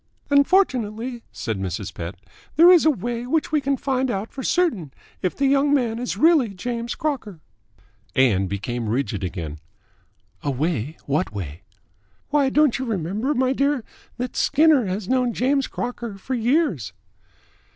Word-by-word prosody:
"And, 280 0 +5
fortunately," 245 - +1
said 110 -5 -4
Mrs. 95 +1 -4
Pett, 85 +3 -6 0.4
"there 340 +4 +8
is 350 -3 +6
a - - +7
way 240 -3 -2
by - - -8
which 310 +3 0
we 305 -1 +2
can 275 0 0
find 265 -1 0
out 205 0 -3
for 270 - -6
certain 250 - 0 0.3
if 185 - -2
the 275 - +1
young 280 +1 +3
man 235 -4 0
is 245 -5 -3
really 280 -7 +4
James 235 +4 -3
Crocker." 250 - -3 0.8
Ann 105 -8 +3
became 110 +4 -3
rigid 115 -4 -1
again. 85 -5 -5 0.8
"A - - -2
way? 145 0 -2
What 150 +6 0
way?" 85 -3 -6 0.7
"Why, 285 -2 +3
don't 290 -2 +3
you 260 - -2
remember, 215 - -1
my 260 +1 +2
dear, 280 -2 +1 0.3
that 250 +1 -4
Skinner 295 -5 +4
has 190 +1 -3
known 250 -1 +1
James 270 +2 +1
Crocker 240 -4 -5
for 255 +7 -5
years." 235 - +1
235 Hz, 160 wpm, -23 LUFS, -, 0.8 s, there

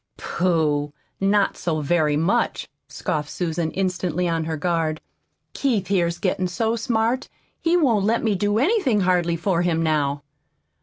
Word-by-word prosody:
"Pooh! 155 -5 0 0.3
Not 200 +1 +2
so 160 -3 -1
very 150 -1 +2
much!" 165 +5 0 0.2
scoffed 150 -1 -3
Susan, 165 -2 -2
instantly 180 -2 -1
on 165 -1 -1
her 160 0 -3
guard. 160 -1 -1 0.5
"Keith 225 -9 0
here's 170 -3 +1
gettin' 185 0 0
so 225 +5 -1
smart 230 +2 0 0.3
he 340 +1 +3
won't 235 - +2
let 230 +2 +1
me 220 -2 +2
do 205 +2 0
anything 275 - +2
hardly 175 -2 +2
for 175 0 0
him 165 -2 +1
now." 145 -2 0
180 Hz, 145 wpm, -23 LUFS, 160-210 Hz, 0.5 s, he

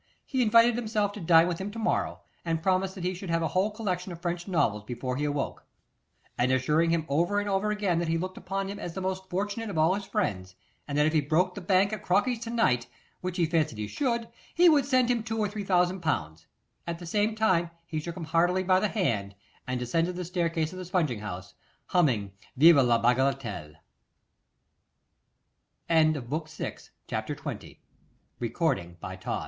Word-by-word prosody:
He 260 - 0
invited 230 +1 +6
himself 215 -3 0
to 210 - -8
dine 165 0 +6
with 175 -2 -2
him 190 +2 -3
to 215 - -9
morrow, 225 - -1 0.2
and 165 -1 -2
promised 190 0 +1
that 185 - -7
he 180 +1 0
should 185 0 -7
have 165 0 +1
a - - +1
whole 190 +3 +1
collection 195 -4 -3
of 170 - -8
French 175 0 -3
novels 110 - +1
before 125 +3 -4
he 145 +3 -1
awoke. 145 -1 -2 0.8
And 125 +1 +3
assuring 150 +6 +2
him 165 -1 +1
over 170 +8 +1
and 205 - -3
over 195 +1 +1
again 205 -5 0
that 170 - -1
he 165 +1 +1
looked 185 +2 -4
upon 195 +1 -3
him 200 +1 -6
as 170 - -6
the 190 - -3
most 190 0 -3
fortunate 205 +4 -2
of 185 - -4
all 160 +3 +4
his 200 0 -3
friends, 95 - -2 0.3
and 145 -1 -2
that 150 - +4
if 155 - +1
he 155 - +4
broke 170 +6 +1
the - - -7
bank 190 +3 +2
at 215 - -4
Crocky's 215 +6 +1
to 230 0 -6
night, 125 - +1 0.3
which 180 0 -4
he 170 - +3
fancied 155 -7 0
he 105 - -3
should, 235 - -1 0.3
he 350 +1 +6
would 290 -5 +5
send 255 -3 +3
him 240 -2 +1
two 225 0 -4
or 215 -1 +1
three 205 0 -5
thousand 180 -1 +2
pounds; 80 - -2 0.4
at 170 0 -3
the 175 - -9
same 210 +5 +1
time 185 -6 +2 0.2
he 160 -2 -3
shook 170 +3 -6
him 175 - -5
heartily 175 +4 +2
by 185 0 +4
the 210 - +1
hand, 110 - -1 0.3
and 125 0 -2
descended 165 +9 0
the 180 0 -4
staircase 170 -2 -1
of 185 - -7
the - - -5
spunging 165 - 0
house, 95 -3 -7 0.4
humming 125 - +2 0.3
Vive 160 +3 +8
la 120 -4 +4
Bagatelle. 120 - 0
175 Hz, 185 wpm, -28 LUFS, 155-200 Hz, 0.8 s, Vive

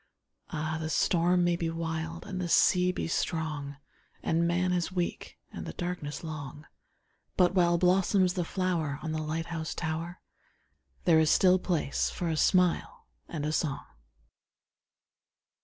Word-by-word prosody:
Ah, 155 -1 -3
the 155 - -3
storm 175 +2 +2
may 175 0 +2
be 170 -1 -2
wild 165 0 -4
and 185 -1 -4
the 175 - -3
sea 180 +1 +4
be 180 - -3
strong, 150 -4 -2 0.5
And 165 +1 +1
man 180 +1 +1
is 175 0 -1
weak 180 -2 -3
and - - -7
the - - -6
darkness 175 -5 -4
long, 150 -2 -7 0.7
But 180 -1 +4
while 175 -2 +3
blossoms 185 +1 +3
the 180 - -1
flower 170 -5 -1
on 160 - -3
the 155 0 -2
light 155 +2 -3
house 160 -1 -4
tower 165 +2 -4 0.9
There 160 -2 +5
still 185 +3 +5
is - - -10
place 165 -6 0
for 175 - -3
a 160 - 0
smile 180 +3 +2 0.2
and 150 -3 -4
a 155 - 0
song. 155 -3 -1
170 Hz, 150 wpm, -29 LUFS, 160-180 Hz, 0.9 s, There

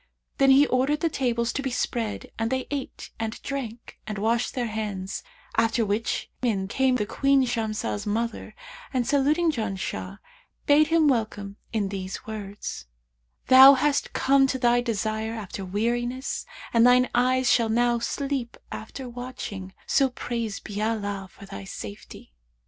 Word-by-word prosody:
Then 275 0 +5
he 275 +2 +7
ordered 280 +3 +1
the 330 - +1
tables 235 -4 0
to 280 - -2
be 270 - -2
spread 235 -3 -2
and 225 0 0
they 260 0 -1
ate 280 -2 -5
and 225 0 -3
drank 245 -4 -6
and 215 -1 -4
washed 230 +4 0
their 250 -2 0
hands; 210 -4 -4 0.4
after 225 0 +2
which 210 +2 -1
in 205 -6 0
came 260 +4 +2
the 215 -4 0
Queen 275 +4 +3
Shamsah's 215 - -2
mother, 230 +3 -2 0.4
and 255 -3 0
saluting 300 +5 +3
Janshah, 195 -5 -4 0.5
bade 295 +1 +5
him 325 -1 +4
welcome 210 -6 -1
in 210 -4 0
these 190 -1 -5
words, 205 - -6 0.6
'Thou 265 +2 +10
hast 285 +2 +1
come 270 0 +4
to 265 - -1
thy 245 -1 +3
desire 220 -1 -2
after 200 -2 -6
weariness 240 - -2 0.3
and 230 -1 +5
thine 250 0 +5
eyes 255 +1 +2
shall 230 -2 +4
now 240 +1 +2
sleep 265 0 -3
after 255 +4 -7
watching; 240 -6 -7
so 275 -2 +3
praised 235 -4 -4
be 205 -1 -5
Allah 205 -3 -2
for 200 - -13
thy 100 - -8
safety!' 100 - -9
235 Hz, 150 wpm, -26 LUFS, 210-260 Hz, 0.6 s, Thou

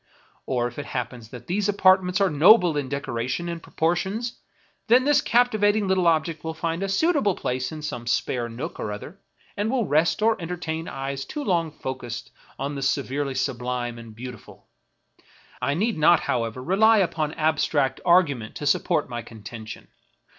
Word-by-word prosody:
Or 120 -2 0
if 120 +3 -8
it 145 - -5
happen 125 -3 -4
that 120 -1 -10
these 200 +5 0
apartments 185 -2 +4
are 195 -2 +3
noble 175 +2 +6
in 145 -3 -2
decoration 130 +3 -3
and 170 -1 -4
proportions, 190 +11 -2 0.5
then 245 +3 +5
this 290 +1 +4
captivating 215 -4 +2
little 190 -2 +2
object 160 -1 +1
will 160 0 -4
find 165 +2 -2
a 195 - -1
suitable 275 - +2
place 130 +3 -2
in 155 -1 -7
some 120 -5 -5
spare 120 0 0
nook 130 +9 -6
or 105 - -3
other, 150 - -8 0.4
and 205 +2 -1
will 245 -3 +1
rest 160 +7 +2
or 220 -3 +2
entertain 165 -1 -4
eyes 135 0 -4
too 295 - -5
long 170 - +1
focused 120 -5 -6 0.3
on 140 +2 -3
the 140 - -5
severely 140 0 -1
sublime 125 -2 -2
and 115 -2 -11
beautiful. 125 -1 -10 1.0
I 140 - 0
need 210 +1 0
not, 165 +2 +5
however, 115 +1 -2
rely 220 +7 +4
upon 160 -6 0
abstract 145 -3 +1
ar 180 +1 +6
gument 125 -9 -6
to 145 - -5
support 145 +1 +1
my 120 -1 -5
contention. 110 0 -10
155 Hz, 170 wpm, -24 LUFS, 125-190 Hz, 1.0 s, noble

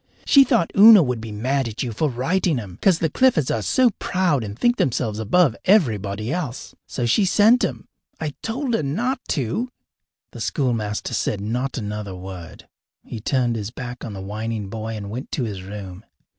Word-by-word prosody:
She 275 - +7
thought 235 -10 +1
Una 210 -2 +9
would 125 -4 -2
be 115 -1 -7
mad 130 +5 -1
at 110 +3 -4
you 120 - -3
for 150 +8 0
writing 150 +6 0
'em, 95 -6 -9
cause 190 -4 +4
the 165 - +1
Cliffords 165 - +2
are 115 - -1
so 250 - +3
proud 175 -9 +1
and 105 0 -7
think 240 - +2
themselves 115 -4 0
above 130 - +3
everybody 110 - +2
else. 145 -8 -5
So 125 - -3
she 160 - +3
sent 215 +6 +4
'em. - - -3 0.3
I 160 - -3
I - - -11
told 255 +2 -2
her 225 - +1
not 235 - -1
to." 145 - -1 0.6
The - - -9
schoolmaster 115 -7 -1
said 105 - -1
not 120 +6 -3
another 105 -3 -5
word. 90 -2 -10 0.4
He 115 - -7
turned 120 +1 0
his 105 -2 -4
back 125 +1 -8
on 110 - -6
the 95 -1 -7
whining 105 0 -4
boy 110 +1 -5
and 100 -1 -7
went 125 +5 -6
to 135 - -1
his 100 -5 -4
room. 95 0 -8
125 Hz, 190 wpm, -22 LUFS, 105-175 Hz, 0.6 s, Una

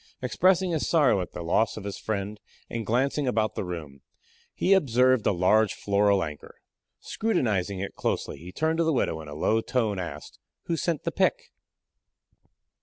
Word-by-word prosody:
Expressing 180 +8 +2
his 160 -3 -1
sorrow 145 - +4
at 90 - -7
the 85 - -6
loss 105 +7 +1
of 110 - -6
his 100 -1 -5
friend, 105 0 -3 0.3
and 115 -3 -4
glancing 135 +4 +1
about 110 -3 +1
the - - -3
room, 80 -7 -7 0.5
he 195 - +3
observed 130 - +3
a - - +4
large 100 +3 +3
floral 100 -1 +2
anchor. 75 -2 -8 0.4
Scrutinizing 105 - -1
it 100 - -4
closely, - - -3
he 90 +2 -10
turned 160 - 0
to - - +4
the 160 -1 +1
widow 80 - 0
and 75 - -10
in 75 - -8
a - - -7
low 110 +7 +2
tone 110 -6 -1
asked, 90 -3 -7 0.2
'Who 170 - -1
sent 165 0 -2
the - - -1
pick?'" - - 0
110 Hz, 180 wpm, -26 LUFS, 95-140 Hz, 0.5 s, sorrow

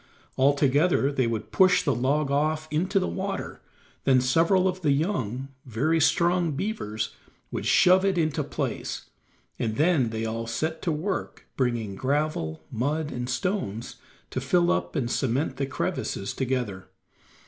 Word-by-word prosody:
Altogether 140 +2 +3
they 130 -4 +1
would 115 -2 -3
push 185 -1 +5
the 145 - +2
log 135 +4 +1
off 155 +2 +1
into 185 +6 +1
the 185 - -1
water, 195 0 -4 0.4
then 130 -2 +5
several 165 +9 +3
of 185 0 -2
the 145 -4 +3
young, 135 - -1 0.5
strong 170 +1 +3
beavers 145 - -3 0.4
would - - -3
shove 185 +1 +5
it 195 -2 +1
into 155 -3 +1
place, - - -4 0.5
and 110 -2 -1
then 150 -5 +3
they 110 0 -3
all 115 +1 -3
set 155 +8 -2
to 170 - 0
work 170 +6 -3
bringing 120 -6 -1
gravel, 130 - -1
mud 145 +6 -1
and 125 0 -4
stones 130 - -2 0.3
to - - -2
fill 85 0 +3
up 85 0 -1
and 120 -1 -1
cement 135 +3 0
the 135 - -1
crevices 100 -6 -3
together. 125 -8 -2
140 Hz, 145 wpm, -26 LUFS, 120-165 Hz, 0.5 s, push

